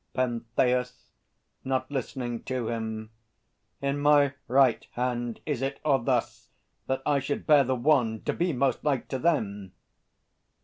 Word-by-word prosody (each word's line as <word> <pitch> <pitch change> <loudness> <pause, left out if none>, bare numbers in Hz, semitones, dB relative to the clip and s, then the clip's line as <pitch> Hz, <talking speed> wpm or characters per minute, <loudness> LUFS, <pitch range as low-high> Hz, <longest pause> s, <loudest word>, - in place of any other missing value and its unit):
PENTHEUS 125 +1 0 0.6
(not 130 +1 -1
listening 125 -3 -3
to 130 -3 -2
him). 110 -1 -4 0.7
In 140 +1 0
my 145 -1 +4
right 130 -2 +4
hand 120 -1 -2
Is 145 -5 -2
it, 135 +1 -2
or 140 -3 +4
thus, - - -1 0.4
that 130 0 -1
I 145 -1 +3
should 140 +1 -3
bear 150 -3 +6
the 130 0 0
wand, 120 -4 +1
To - - 0
be 175 0 0
most 130 -2 0
like 140 -4 0
to 130 - -2
them? 105 - -1
130 Hz, 140 wpm, -27 LUFS, 120-140 Hz, 0.7 s, bear